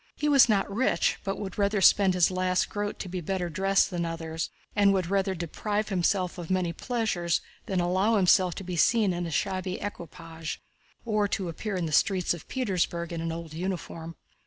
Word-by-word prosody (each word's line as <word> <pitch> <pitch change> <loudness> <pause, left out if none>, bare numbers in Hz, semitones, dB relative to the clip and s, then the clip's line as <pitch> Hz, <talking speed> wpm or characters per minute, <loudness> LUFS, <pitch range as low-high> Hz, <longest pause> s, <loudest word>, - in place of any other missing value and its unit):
He 295 - -1
was 275 -4 +6
not 200 -2 +2
rich, 260 +4 +1
but 195 -1 -2
would 195 -3 -5 0.3
spend 190 -2 +5
his 180 0 +4
last 185 0 +1
groat 205 0 -3
to - - -6
be 180 0 -4
better 180 0 -2
dressed 195 +5 +2
than 175 -1 -2
others, 165 -1 -4 0.3
and 200 -1 +5
would 185 -2 -1
rather 195 -1 +1
deprive 205 +5 -2
himself 185 -1 0
of 170 - -7
many 185 -2 0
pleasures 180 -7 -1 0.3
than 190 -2 0
allow 185 +5 +2
himself 185 -2 +4
to 195 - -6
be 180 -1 -4
seen 210 +2 +3
in 175 0 -3
a - - -4
shabby 185 +2 -2
equipage 165 -4 -7 0.5
or 215 -2 +1
appear 190 +3 -4
in 180 -2 -1
the 160 - -4
streets 185 +3 +2
of 170 - -10
Petersburg 175 -8 -1
in 165 - -3
an 165 0 -2
old 165 -1 -7
uniform. 165 -2 -5
185 Hz, 185 wpm, -27 LUFS, 170-200 Hz, 0.5 s, was